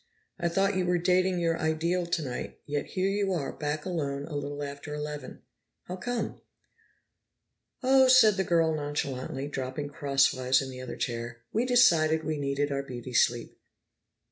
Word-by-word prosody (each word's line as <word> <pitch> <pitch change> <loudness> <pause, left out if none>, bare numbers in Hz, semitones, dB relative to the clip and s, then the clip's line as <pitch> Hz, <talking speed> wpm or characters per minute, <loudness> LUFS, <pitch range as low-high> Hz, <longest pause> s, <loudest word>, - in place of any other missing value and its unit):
I 170 - +1
thought 195 +3 +1
you 185 -1 0
were 180 0 +3
dating 185 +1 +2
your 165 -1 0
ideal 170 +2 0
tonight, 150 -8 -3
yet 145 0 -2
here 185 0 -1
you 195 -1 0
are, 140 -6 -2
back 150 0 -3
alone 145 -6 -2
a 150 - -7
little 145 0 -4
after 140 +1 -6
eleven. 150 0 -6 0.4
How 180 - -6
come?" 245 +6 -4 1.4
"Oh," 265 0 +6
said 245 -5 +7
the 190 - +1
girl 165 -3 +2
nonchalantly, 145 -2 -3
dropping 135 +1 -4
crosswise 135 -2 +2
in 135 -1 -4
the 130 0 -8
other 130 - -6
chair, 120 -1 -4
"we 235 +4 +1
decided 165 -11 +4
we 155 -1 -2
needed 140 +1 -1
our 140 0 -1
beauty 125 -2 -8
sleep." 120 0 +2
150 Hz, 160 wpm, -28 LUFS, 140-180 Hz, 1.4 s, said